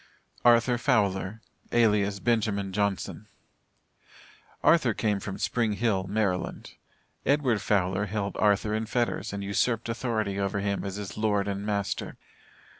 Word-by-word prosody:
ARTHUR 120 0 +4
FOWLER, 105 -4 +1 0.3
ALIAS 105 -4 +3
BENJAMIN 100 -2 0
JOHNSON. 100 -1 -2 1.4
Arthur 135 -9 +4
came 105 -3 0
from 95 0 -5
Spring 115 -3 0
Hill, 100 -3 0
Maryland. 100 -3 -2 0.5
Edward 135 -7 +2
Fowler 95 0 +1
held 100 0 -3
Arthur 105 0 +2
in 110 +1 -1
fetters 115 -3 -1
and 100 0 -4
usurped 115 +4 0
authority 110 -4 -1
over 100 +1 -1
him 100 0 -1
as 95 -1 -4
his 100 -1 -6
lord 105 -2 +1
and 100 +1 -3
master. 100 -1 -2
105 Hz, 125 wpm, -27 LUFS, 100-115 Hz, 1.4 s, ARTHUR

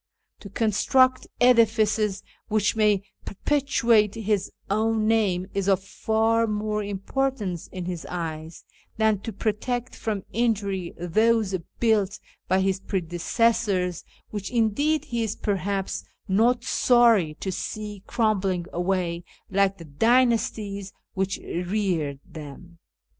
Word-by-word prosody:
To 200 - -10
construct 255 +5 +2
edifices 220 -4 +3 0.2
which 210 0 +1
may 210 -3 +3 0.2
perpetuate 230 -4 +2
his 210 -3 -1 0.2
own 215 +1 +1
name 200 -5 +2
is 195 -1 -1
of 190 -1 +2
far 225 +3 +1
more 210 0 -1
importance 205 -1 -2
in 185 -2 -6
his 175 -2 -5
eyes 160 -2 -5 0.3
than 220 -2 +2
to 225 - -6
protect 225 +4 -2
from 210 -4 -3
injury 200 -6 -1
those 215 +3 +2 0.2
built 215 -4 +2 0.3
by 190 +1 +3
his 190 0 +1
predecessors, 185 +1 0 0.3
which, 205 -2 -4
indeed, 250 +7 +1
he 235 -1 -2
is 220 -1 -2
perhaps 195 -1 -2 0.2
not 230 +5 +3
sorry 230 -10 +4
to 190 - -4
see 210 +2 -5
crumbling 195 -6 0
away 175 -1 -1 0.3
like 195 0 +2
the 165 - -10
dynasties 210 - +1 0.2
which 190 0 -1
reared 175 -6 -1
them. 165 +3 -11
205 Hz, 115 wpm, -25 LUFS, 185-225 Hz, 0.3 s, sorry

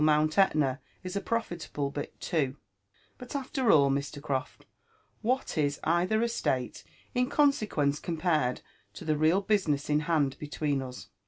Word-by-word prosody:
Mount 155 +2 +3
Etna 150 -8 +3 0.2
is 185 +1 -5
a 200 - 0
profitable 170 -11 -2
bit 145 0 -6
too. 140 -4 -1 0.6
But 250 +2 -8
after 265 -4 +1
all, 140 -3 +5
Mr. 140 +1 -2
Croft, 135 -2 -3 0.6
what 250 -7 0
Is 145 -1 +1
either 180 +7 +2
estate 130 - -1 0.3
in 250 +1 +1
consequence 210 - +2
compared 160 -7 0 0.3
to - - -8
the 155 -1 +2
real 160 +6 +3
business 170 -9 +1
in 150 - +4
band 150 -4 0
between 145 -2 -1
us? 130 -1 -8
155 Hz, 145 wpm, -29 LUFS, 140-200 Hz, 0.6 s, all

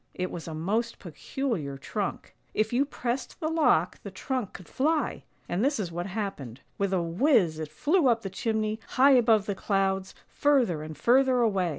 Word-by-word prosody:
It 185 0 -3
was 170 - -7
a 160 - -5
most 215 +9 -1
peculiar 175 - -4
trunk. 200 +8 -4 0.2
If 215 +2 0
you 265 +4 +3
pressed 255 -2 -4
the 315 - -1
lock 320 -1 +2
the - - -7
trunk 255 -7 -4
could 180 - -11
fly; 310 +3 0 0.3
and 180 +5 -1
this 280 0 +1
is 180 -5 -3
what 175 +2 -4
happened: 190 - -5 0.2
with 200 -1 0
a 185 -3 +1
whiz 175 - +2
it 155 -1 -4
flew 305 - +2
up 230 -2 +2
the 195 - -5
chimney, 220 +1 -1 0.2
high 275 +2 +7
above 225 -5 +4
the 205 - -1
clouds, 195 -1 -1
further 250 - +2
and 155 -1 -8
further 255 - +4
away. 195 -6 +2
215 Hz, 185 wpm, -27 LUFS, 175-255 Hz, 0.3 s, high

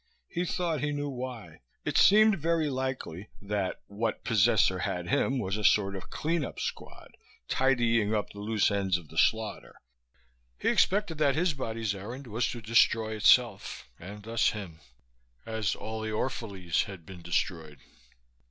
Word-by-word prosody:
He 175 0 -2
thought 170 -5 -1
he 150 0 0
knew 145 0 -2
why. 125 - -7 0.2
It - - -2
seemed 215 -1 +6
very 160 -1 +1
likely 130 -8 -4
that 100 -2 -3
what 110 +2 -3
possessor 110 -4 +3
had 90 -1 -3
him 135 +8 +1
was 100 -4 -2
a 105 - -4
sort 100 -1 +3
of 95 - -8
clean 165 0 -1
up - - -6
squad, - - -6 0.3
tidying 120 -5 +2
up 105 -2 -1
the 100 - -11
loose 105 0 +1
ends 95 -3 +1
of 85 -4 -13
the 80 - -11
slaughter; 110 -2 0 0.8
he - - 0
expected 190 -5 +2
that 140 -3 +3
his 170 +1 +2
body's 115 -5 -3
errand 120 +8 -7
was 115 0 -1
to 120 -2 -6
destroy 115 0 +3
itself, 105 - +3
and 100 +4 -9
thus 115 +1 +2
him, 95 -7 -7 0.7
as 110 -3 -1
all 110 0 -5
the 110 - -3
Orphalese 100 -7 -1
had 95 -5 -10
been 90 -1 -10
destroyed. 85 -3 -2
110 Hz, 160 wpm, -29 LUFS, 100-130 Hz, 0.8 s, seemed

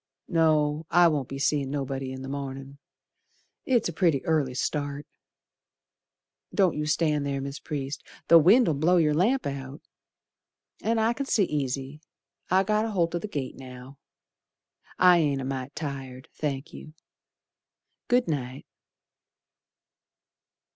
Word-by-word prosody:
No, 155 -2 +2
I 175 0 +6
won't 145 -5 -1
be 135 - -5
seein' 140 0 0
nobody 135 -1 -3
in 130 0 -7
the - - -6
mornin', 135 0 -6 0.9
It's 245 -4 +2
a 170 - -5
pretty 160 -5 +1
early 150 -6 0
start. 145 +1 -2 1.5
Don't 190 -4 +2
you 150 0 -2
stand 155 -2 +1
ther, 140 -1 -2
Mis' 140 +2 -6
Priest, 140 -2 -5 0.3
The 170 0 +8
wind'll 195 +3 +5
blow 160 +6 +3
yer 155 -3 +3
lamp 225 - +2
out, 135 +1 -5 1.0
An' 230 +1 0
I 225 +1 +2
c'n 275 +3 -4
see 210 - +3
easy, 140 -2 -3 0.5
I 190 +1 +4
got 215 +2 +1
aholt 175 -7 0
o' 175 - -1
the 215 - -5
gate 140 -9 -5
now. 130 +1 -11 1.0
I 180 -1 +6
ain't 145 -4 +1
a 130 - -4
mite 135 +1 -5
tired, 135 -4 -6
thank 140 -1 -4
you. 155 - -11 1.1
Good 245 0 +2
night. 135 -4 -4
150 Hz, 135 wpm, -26 LUFS, 135-170 Hz, 1.5 s, The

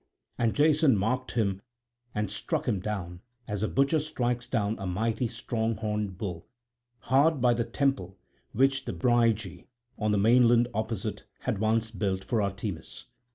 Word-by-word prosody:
And 115 -2 +1
Jason 150 -4 +4
marked 125 +6 -1
him 100 -4 0 0.5
and 105 -2 -1
struck 155 +9 -2
him 105 -6 +1
down, 90 -3 -5 0.3
as 105 -2 -3
a 110 - +1
butcher 140 +6 +2
strikes 125 -5 -2
down 110 -4 0
a 95 - -4
mighty 110 +6 0
strong 115 -1 -2
horned 105 -3 -2
bull, 90 -5 -5 0.5
hard 140 +4 +3
by 120 -1 +4
the 115 -1 -1
temple 120 -7 -1 0.3
which 135 +2 +2
the - - -3
Brygi 115 -7 +1 0.3
on 105 -1 +1
the 105 - +2
mainland 120 +2 +5
opposite 110 -1 -3 0.2
had 115 -6 -2
once 110 +1 +1
built 95 -2 -2
for 115 -4 0
Artemis. 100 -3 -4
110 Hz, 155 wpm, -28 LUFS, 100-125 Hz, 0.5 s, mainland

